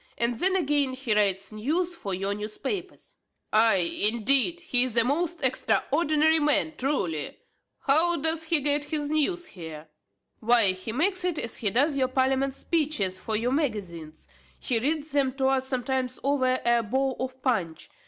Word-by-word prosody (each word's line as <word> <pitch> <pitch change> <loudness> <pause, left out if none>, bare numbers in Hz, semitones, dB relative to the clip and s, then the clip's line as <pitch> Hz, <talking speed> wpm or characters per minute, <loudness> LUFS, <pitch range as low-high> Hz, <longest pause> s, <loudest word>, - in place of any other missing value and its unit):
and 235 0 +1
then 380 +1 +5
again 290 -6 +1
he 260 -4 -2
writes 195 -1 +1
news 320 +12 -2
for 200 -12 -6
your 195 +2 -1
newspapers." 265 - -6 0.4
"Ay, 215 -6 +3
indeed! 270 +9 +1
he 250 -8 +2
is 250 -2 -3
a 230 - +6
most 320 +5 -2
extraordinary 300 - +2
man, 300 +1 +1
truly! 190 - -2 0.4
How 320 +5 +3
doth 320 +2 +1
he 320 -2 +2
get 290 +1 +2
his 295 -1 -2
news 340 +4 0
here?" 160 -3 -10 0.5
"Why 230 -3 +3
he 185 +4 -6
makes 365 - 0
it, 360 -3 -1
as 230 -4 -3
he 210 - +1
doth 280 +8 +1
your 265 -2 +1
parliament 265 +1 0
speeches 280 - -1
for 220 +3 -3
your 235 +3 -1
magazines. 190 - -4 0.3
He 240 -4 -1
reads 300 +4 -2
them 275 -2 +1
to 270 0 -2
us 265 -1 0
sometimes 260 -1 -2
over 260 -2 +1
a 235 0 +3
bowl 260 +4 -1
of 260 0 -5
punch. 190 - -2
260 Hz, 165 wpm, -26 LUFS, 220-300 Hz, 0.5 s, a